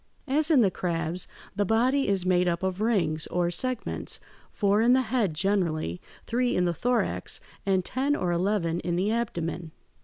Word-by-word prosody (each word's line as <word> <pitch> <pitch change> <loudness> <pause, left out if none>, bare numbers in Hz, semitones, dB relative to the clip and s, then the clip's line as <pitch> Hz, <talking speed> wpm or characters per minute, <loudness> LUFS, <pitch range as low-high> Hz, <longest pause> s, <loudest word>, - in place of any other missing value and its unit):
As 300 +4 +2
in 295 -6 +6
the 195 -4 +3
crabs, 170 0 -2 0.3
the 205 - +2
body 250 +7 +2
is 195 -2 0
made 180 -1 +3
up 170 +1 -1
of 190 +1 -1
rings, 170 -9 +1
or 175 -1 0
segments: 255 +4 -2 0.3
four 205 0 +2
in 240 +2 +5
the 260 0 +4
head 220 -9 0
generally, 165 - 0 0.2
three 245 +1 0
in 180 - +2
the 175 - +1
thorax, 245 +8 -1 0.3
and 190 -2 +2
ten 275 +3 0
or 180 -8 -1
eleven 175 -1 0
in 175 0 -2
the 190 +4 +1
abdomen. 175 -7 -2
190 Hz, 175 wpm, -27 LUFS, 175-235 Hz, 0.3 s, in